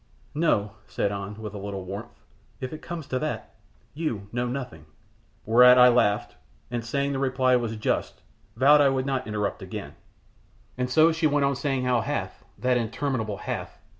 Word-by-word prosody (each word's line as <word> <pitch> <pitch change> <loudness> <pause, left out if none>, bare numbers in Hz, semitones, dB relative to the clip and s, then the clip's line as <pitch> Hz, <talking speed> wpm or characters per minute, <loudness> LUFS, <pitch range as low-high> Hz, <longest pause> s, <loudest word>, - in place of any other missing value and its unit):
"No!" 145 -10 +1 0.2
said 100 - -1
An, 100 +1 -6
with 105 -2 -6
a 105 - -6
little 100 -1 -5
warmth. 105 +6 -8 0.4
"If 130 +2 -5
it 155 - -8
comes 170 -4 -6
to 130 - -2
that, 155 +1 -4 0.4
you 115 -11 -3
know 120 +1 -1
nothing." 120 - -6 0.6
Whereat 125 +2 +7
I 125 0 +8
laughed, 105 -4 +1 0.3
and, 120 -1 -2
saying 140 +4 -1
the 135 - -2
reply 130 -1 +2
was 115 -2 -1
just, 110 - -2 0.3
vowed 145 +5 +6
I 140 - +5
would 130 -1 0
not 135 -2 -2
interrupt 105 -1 -2
again; - - -7 0.9
so 155 +6 +5
she 160 0 +1
wont 145 -1 +2
on 140 0 +1
saying 135 -1 -1
how 125 -2 +2
Hath - - -4
that 125 +4 +1
interminable 115 -2 -2
Hath! - - -5
125 Hz, 170 wpm, -26 LUFS, 110-140 Hz, 0.9 s, I